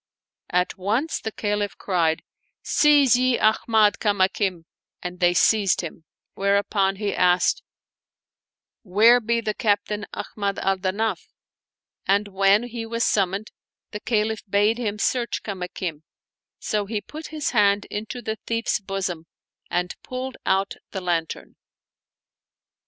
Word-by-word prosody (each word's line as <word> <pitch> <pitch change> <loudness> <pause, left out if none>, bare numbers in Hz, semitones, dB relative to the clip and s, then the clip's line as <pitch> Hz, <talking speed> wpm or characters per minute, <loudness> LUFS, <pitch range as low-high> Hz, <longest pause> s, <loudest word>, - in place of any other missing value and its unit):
At 180 +1 0
once 225 - 0
the 220 - -4
Caliph 205 -1 -2
cried, 165 -4 0 0.3
" - - -49
Seize 290 -5 +5
ye 255 0 +2
Ahmad 215 -1 +3
Kamakim! 190 -3 +1 0.2
" - - -25
and 180 0 -6
they 175 -1 +3
seized 195 +2 +3
him; 165 -1 -8 0.3
whereupon 200 0 +1
he 205 0 -2
asked, 180 0 +3 0.7
" - - -69 0.2
Where 235 +3 +8
be 235 0 0
the 215 -1 -2
Captain 210 -2 0
Ahmad 200 -2 -3
al 195 0 +1
Danaf? 200 +4 -1 0.4
" - - -62
And 205 0 -7
when 195 +2 +3
he 240 -1 -5
was 230 +1 -2
summoned 195 +1 0 0.4
the 210 - -5
Caliph 220 -1 0
bade 210 +4 +2
him 210 -3 -2
search 240 +2 -1
Kamakim; 180 -5 -5 0.6
so 210 -2 -2
he 215 0 -2
put 305 +9 -9
his 305 -2 -3
hand 205 -3 +3
into 220 +4 -5
the 220 0 -3
thief's 230 -1 0
bosom 190 -5 -4 0.4
and 180 0 -1
pulled 255 +1 -5
out 195 +1 +1
the 190 - -5
lantern. 170 -3 -3
205 Hz, 135 wpm, -24 LUFS, 190-225 Hz, 0.7 s, Where